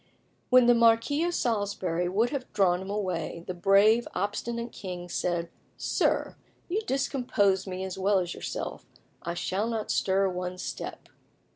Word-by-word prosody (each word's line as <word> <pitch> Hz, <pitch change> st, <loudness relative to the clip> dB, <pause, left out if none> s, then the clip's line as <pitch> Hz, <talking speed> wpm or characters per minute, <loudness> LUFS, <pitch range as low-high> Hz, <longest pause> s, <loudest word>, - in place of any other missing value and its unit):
When 255 Hz, -1 st, +7 dB
the 240 Hz, -, +7 dB
Marquis 235 Hz, +6 st, +4 dB
of 350 Hz, 0 st, -1 dB
Salisbury 195 Hz, -6 st, -1 dB
would 220 Hz, +6 st, +1 dB
have 275 Hz, -3 st, -4 dB
drawn 185 Hz, -3 st, +3 dB
him 190 Hz, -, -7 dB
away, 180 Hz, -5 st, -3 dB
the 185 Hz, -, -4 dB
brave, 200 Hz, +6 st, +4 dB
obstinate 235 Hz, +4 st, -2 dB
king 180 Hz, -3 st, -7 dB
said 175 Hz, -1 st, -1 dB, 0.3 s
"Sir, -, -, 0 dB, 0.3 s
you 390 Hz, +5 st, -1 dB
discompose 220 Hz, -8 st, +1 dB
me 185 Hz, 0 st, -4 dB
as 190 Hz, 0 st, -5 dB
well 200 Hz, +1 st, +3 dB
as 180 Hz, -1 st, -1 dB
yourself: -, -, -5 dB, 0.4 s
I 170 Hz, -, -4 dB
shall 195 Hz, +5 st, -1 dB
not 225 Hz, -2 st, -2 dB
stir 195 Hz, 0 st, +2 dB
one 180 Hz, 0 st, -4 dB
step." -, -, -6 dB
195 Hz, 150 wpm, -28 LUFS, 180-235 Hz, 0.4 s, When